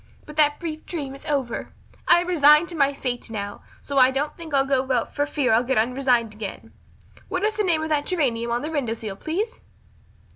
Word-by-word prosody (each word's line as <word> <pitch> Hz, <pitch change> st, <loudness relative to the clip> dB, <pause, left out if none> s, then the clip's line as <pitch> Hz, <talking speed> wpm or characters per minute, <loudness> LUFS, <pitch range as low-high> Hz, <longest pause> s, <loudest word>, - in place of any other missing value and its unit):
But 300 Hz, -, -11 dB
that 295 Hz, -1 st, +4 dB
brief 315 Hz, -3 st, -5 dB
dream 285 Hz, -6 st, -4 dB
is 275 Hz, -, -12 dB
over. 270 Hz, -5 st, -2 dB, 0.3 s
I 345 Hz, -, +6 dB
am 355 Hz, -, -5 dB
resigned 300 Hz, -1 st, +6 dB
to 345 Hz, -, -6 dB
my 280 Hz, -2 st, +3 dB
fate 250 Hz, -4 st, -4 dB
now, 205 Hz, -2 st, -5 dB, 0.2 s
so 280 Hz, -1 st, 0 dB
I 255 Hz, 0 st, +7 dB
don't 275 Hz, +3 st, -2 dB
think 330 Hz, -2 st, -9 dB
I'll 275 Hz, -1 st, +3 dB
go 265 Hz, -1 st, 0 dB
out 245 Hz, -3 st, 0 dB
for 290 Hz, 0 st, 0 dB
fear 280 Hz, -5 st, +1 dB
I'll 225 Hz, -, +5 dB
get 255 Hz, +1 st, -1 dB
unresigned 245 Hz, -1 st, +1 dB
again. 210 Hz, -2 st, -8 dB, 0.5 s
What 370 Hz, -1 st, -2 dB
is 430 Hz, +1 st, +2 dB
the 425 Hz, -, -1 dB
name 330 Hz, -5 st, +1 dB
of 315 Hz, -, -3 dB
that 295 Hz, -2 st, 0 dB
geranium 245 Hz, -10 st, 0 dB
on 235 Hz, +2 st, -1 dB
the 310 Hz, -, -4 dB
window 255 Hz, -8 st, -1 dB
sill, 215 Hz, -3 st, -6 dB
please?" 390 Hz, -, -3 dB
280 Hz, 220 wpm, -24 LUFS, 245-315 Hz, 0.5 s, I